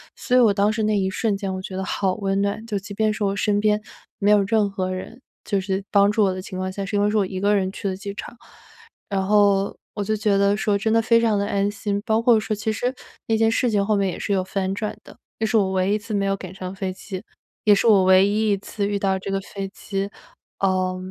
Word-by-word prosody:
所 250 - -1
以 - - +7
我 225 -4 +6
当 205 +1 +2
时 220 - -2
那 215 -1 +1
一 190 - 0
瞬 205 0 0
间 195 -2 -3
我 185 - -4
觉 190 0 -6
得 190 - -3
好 190 -1 0
温 195 -2 -1
暖， 200 +2 -2
就 210 -3 -2
即 200 +1 -9
便 215 0 +1
是 210 - -3
我 200 0 0
身 205 0 +1
边 210 0 +2 0.4
没 205 +1 +2
有 205 -1 +6
任 210 0 +2
何 185 -2 -2
人 230 +7 -7 0.2
就 200 -2 0
是 190 0 -2
帮 200 0 +5
助 210 0 +2
我 190 - +2
的 185 - -5
情 185 -1 -8
况 185 0 -2
下， 200 +1 -5
是 205 - -4
因 205 - +2
为 205 - +3
是 215 - +1
我 200 - +3
1 185 0 -5
个 205 +2 +2
人 190 -1 0
去 200 - -5
的 185 - -3
机 200 +1 -6
场， 235 - -8 0.7
然 195 -1 0
后 200 -1 +3 0.2
我 205 - -2
就 215 +1 0
觉 210 -2 +1
得 200 +1 +3
说 210 -2 +1
真 220 +2 -1
的 225 - +4
非 230 +1 +4
常 220 -3 +2
地 200 - 0
安 200 0 +1
心。 205 -1 -3
包 220 0 +2
括 230 -2 +5
说 215 0 -2
其 210 +2 -2
实 245 +4 -1 0.3
那 225 - +2
件 225 0 +3
事 245 +2 +1
情 200 -1 +2
后 215 0 +2
面 200 -1 +1
也 - - -5
是 205 - -3
有 190 - +2
反 190 0 -2
转 215 0 -4
的， - - -15 0.2
那 220 - +1
是 225 - +2
我 195 -3 +2
唯 185 +1 +1
一 210 - +3
一 - - -1
次 215 +1 -7
没 200 -1 +1
有 195 0 +1
赶 185 -1 -9
上 185 0 -6
飞 190 -1 -3
机， 190 0 -7 0.4
也 210 - +7
是 195 - 0
我 200 -4 +6
唯 185 +1 +6
一 215 +1 +1
一 200 - +2
次 200 0 -3
遇 205 - -1
到 190 -1 0
这 195 - -6
个 195 - -1
飞 195 0 -6
机， 195 0 -4 0.5
呃， 185 -1 +1
200 Hz, 300 characters per minute, -23 LUFS, 195-215 Hz, 0.7 s, 以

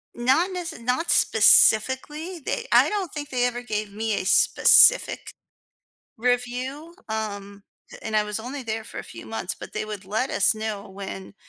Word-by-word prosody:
Not 265 +10 +1
nece 355 -8 -6
not 250 +8 -2
specifically. 295 - +3
They 475 - -4
I - - +5
don't 390 -6 -3
think 295 -1 -7
they 245 -1 0
ever 245 0 -3
gave 210 -3 -4
me 220 0 -2
a 185 - -2
specific - - +4 0.8
review, 250 +6 -3 0.2
um, 200 -2 -5 0.4
and 220 -1 -3
I 210 - +3
was 210 +1 -4
only 260 +3 -7
there 220 -1 -4
for - - -9
a - - -5
few - - -11
months, - - -4
but - - -11
they - - -3
would 205 -3 -8
let 220 +7 -2
us 200 +2 +2
know 215 -1 -5
when 190 0 -9
240 Hz, 165 wpm, -24 LUFS, 210-280 Hz, 0.8 s, I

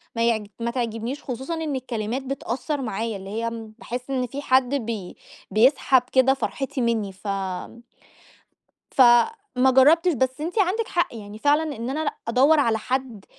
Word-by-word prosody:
ما 230 - +1
يعج 220 -3 0
ما 235 0 -1
تعجبنيش، 235 +2 -3
خصوصًا 265 +5 -4
إن 320 -3 -2
الكلمات 245 -1 -3
بتأثر 270 +2 -3
معايا، 220 -2 -3
اللي 195 0 -9
هي 230 +3 -2 0.3
باحس 250 +2 -6
إن 255 -2 -1
فيه 275 +4 -6
حد 260 -1 +2
بي 225 -8 -4 0.3
بيسحب 255 +4 +4
كده 260 0 +5
فرحتي 270 0 -3
مني، 225 -4 0
ف 190 +2 -12 1.6
فما 260 - +4
جربتش، 325 +7 +5
بس 260 +1 -1
أنتِ 350 +7 -2
عندِك 405 +4 +1
حق 345 -8 -1
يعني، 210 -1 -9
فعلًا 290 +5 +3
إن 230 +2 -5
أنا 285 +4 -2
لأ 290 - -1
أدوّر 275 +6 +4
على 230 -5 +2
حد 245 -2 -3
255 Hz, 155 wpm, -24 LUFS, 230-280 Hz, 1.6 s, كده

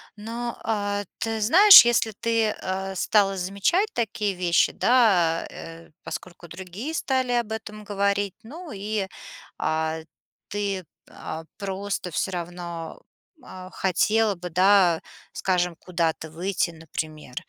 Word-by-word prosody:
но, 230 +3 -5
а 205 -2 -1 0.2
ты 225 0 -2
знаешь, 360 - +9
если 235 -2 +2
ты, 230 -2 +1
э, 190 +1 -4
стала 195 +1 +2
замечать 200 - +1
такие 210 -3 -1
вещи, 175 -2 +2
да, 195 -10 +3
э, 165 0 -11
поскольку 175 -1 -8
другие 190 - -7
стали 260 -4 0
об 235 -3 0
этом 215 -1 -6
говорить. 200 -1 0
Ну 320 +9 -10
и, 205 -1 -3 0.5
а, 160 0 -1 0.5
ты, 200 -2 -2 0.3
а, 160 +1 -7
просто 195 -1 -4
всё 190 - -1
равно, 170 -2 -6 0.4
а, 185 0 -10
хотела 210 +4 +2
бы, 180 0 -7
да, 185 -1 +4 0.3
скажем, 180 -2 0
куда-то 165 -2 -2
выйти, 175 +2 -1
например. 155 -4 -7
195 Hz, 120 wpm, -25 LUFS, 175-220 Hz, 0.5 s, знаешь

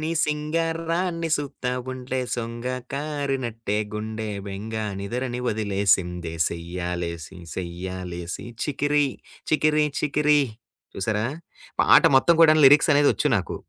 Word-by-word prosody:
నీ 155 +1 -2
సింగరాన్ని 165 +3 -1
సూత్తా 140 -3 -4 0.2
ఉంటే 130 0 -4 0.2
సొంగ 115 0 -5 0.3
కారినట్టే 135 -7 -2 0.2
గుండె 110 0 -4 0.2
బెంగ 100 +3 -6 0.3
నిదరని 125 +5 -3
వదిలేసిందే 95 -5 0
సయ్యాలేసి 85 0 -5 0.2
సయ్యాలేసి 90 0 -5 0.2
చికిరి 145 0 +1 0.4
చికిరి 155 -1 +3
చికిరి 150 0 +3 0.5
చూసారా 105 +3 -1 0.6
పాట - - +7
మొత్తం 170 +5 +4
కూడా 155 -1 +7
లిరిక్స్ 150 +4 +6
అనేది 145 0 +5
వచ్చు - - -1
నాకు. 95 - -3
120 Hz, 100 wpm, -24 LUFS, 95-150 Hz, 0.6 s, పాట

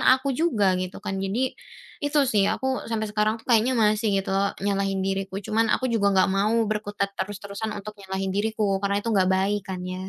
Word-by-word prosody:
aku 260 +1 +4
juga 230 - +2
gitu 185 +1 -5
kan. 195 -1 -2
Jadi 230 +7 -1 0.5
itu 290 +1 0
sih, 205 -5 +2
aku 265 0 -2
sampai 225 -1 -1
sekarang 215 +1 +1
tuh 225 - -17
kayaknya 235 +2 +4
masih 215 -1 +2
gitu 195 0 -1
lho, 195 +1 0
nyalahin 195 -1 0
diriku. 195 0 -2
Cuman 225 +1 +1
aku 255 +1 +1
juga 200 -3 +3
nggak 185 - +5
mau 210 +4 +2
berkutat 205 -2 -2
terus-terusan 200 +2 -4
untuk 210 +1 -7
nyalahin 190 0 -3
diriku, 215 +2 0 0.2
karena 200 0 0
itu - - -2
nggak 190 -2 +3
baik 195 +2 +1
kan 185 -1 -4
ya. 185 +1 -5
205 Hz, 195 wpm, -25 LUFS, 195-220 Hz, 0.5 s, nggak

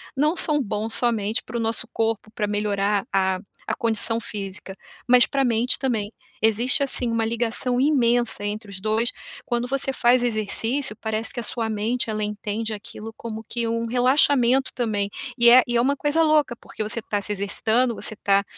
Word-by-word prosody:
não 300 +5 +1
são 300 -4 +5
bons 215 -1 -4
somente 225 -2 +1
para 220 - -10
o - - -2
nosso 225 +1 -1
corpo 225 -1 -2
pra 210 -1 -3
melhorar 205 -1 -1
a 190 -1 +1 0.3
a - - -1
condição 230 -1 0
física, 195 -3 -6 0.3
mas 250 0 +6
para 275 - -1
a - - +2
mente 240 +1 +2
também. 220 -5 -2 0.3
Existe, 235 +6 +3
assim, 255 -3 +2
uma 230 -1 0
ligação 235 +2 0
imensa 240 -6 +2
entre 210 +1 -5
os 195 -1 -6
2, 220 +4 0 0.3
quando 240 0 -2
você 270 +1 0
faz 250 -1 +3
exercício, 230 +2 -1
parece 220 0 -1
que 245 - -4
a - - -4
sua 230 0 -2
mente 220 +4 -2
ela 215 -1 -3
entende 210 +1 -4
aquilo 220 +1 -9
como 220 -1 -7
que 235 -1 -2
um 230 0 -2
relaxamento 255 +1 +3
também 210 -5 -1 0.3
e 235 -1 +5
é 250 +1 +8
e 240 - -2
é - - +3
uma 275 +3 +1
coisa 295 +3 +1
louca, 305 -5 +2
porque 215 - -7
você 230 +2 -1
tá 210 -1 -2
se 210 - -2
exercitando, 220 +4 0
você 215 - -1
tá 200 -1 +1
230 Hz, 185 wpm, -23 LUFS, 215-245 Hz, 0.3 s, é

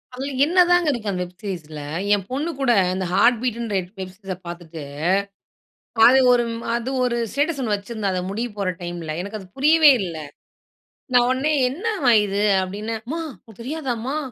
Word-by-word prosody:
அதில 270 +3 -4
என்னதாங்க 355 0 +4
இருக்கு 225 -6 -3
அந்த 180 -1 -3
வெப் 180 0 -12
சீரிஸ்ல. 160 -7 -6 0.3
என் 200 -2 0
பொண்ணு 290 +6 -2
கூட 270 -3 +2 0.2
அந்த 185 0 -2
Heart 200 +6 +5
Beatன்ற 235 -3 -2
எப் 180 0 -13
வெப் 185 -1 -5
சீரிஸ்ஸ 195 -2 -6
பார்த்துட்டு, 170 -2 -8 1.3
அது 260 +2 +7
ஒரு 240 -1 +3 0.3
அது 235 +2 -2
ஒரு 240 -1 0 0.2
ஸ்டேட்டஸ் 290 +2 0
ஒண்ணு 220 -4 0
வச்சுருந்தா 205 0 -3
அத 185 - -1
முடிய 230 +5 -2
போற 200 -2 -1
டைம்ல. 175 -2 -5
எனக்கு 200 +3 -6
அது 190 - -12
புரியவே 305 +2 +6
இல்ல. 170 -4 -5 1.0
நான் 245 -1 +5
உடனே, 265 +4 +1 0.2
என்னம்மா 315 - 0
இது 200 0 -2 0.2
அப்டின்னே? 205 +4 -4
"அம்மா 315 +8 -4 0.2
உனக்கு 220 -1 -16
தெரியாதாமா 265 -2 -3
230 Hz, 165 wpm, -22 LUFS, 190-270 Hz, 1.3 s, அது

